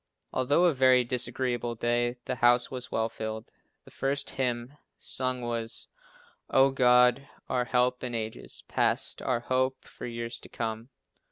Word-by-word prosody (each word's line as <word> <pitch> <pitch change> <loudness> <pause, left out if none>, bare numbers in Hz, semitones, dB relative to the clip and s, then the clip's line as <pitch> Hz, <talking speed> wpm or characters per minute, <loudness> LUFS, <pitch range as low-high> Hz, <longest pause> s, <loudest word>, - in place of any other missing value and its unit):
Although 145 +7 +3
a 170 - +4
very 130 -1 +5
disagreeable 120 -1 -1
day, 120 +1 0
the 125 -2 -3
house 120 +1 +4
was 125 -1 -6
well 110 0 +1
filled. 110 0 -6 0.3
The - - -15
first 140 +1 -1
hymn 125 0 -2 0.2
sung 130 -1 -2
was 115 -1 -3 0.6
"Oh 135 +1 +5
God 125 +1 +4 0.2
our 125 -1 0
help 125 +1 +1
in 125 -2 -3
ages 110 -1 -5
past, - - 0
our 120 -2 0
hope 130 +1 0
for - - -8
years 115 0 -4
to - - -13
come." 115 +1 -4
125 Hz, 150 wpm, -28 LUFS, 120-130 Hz, 0.6 s, very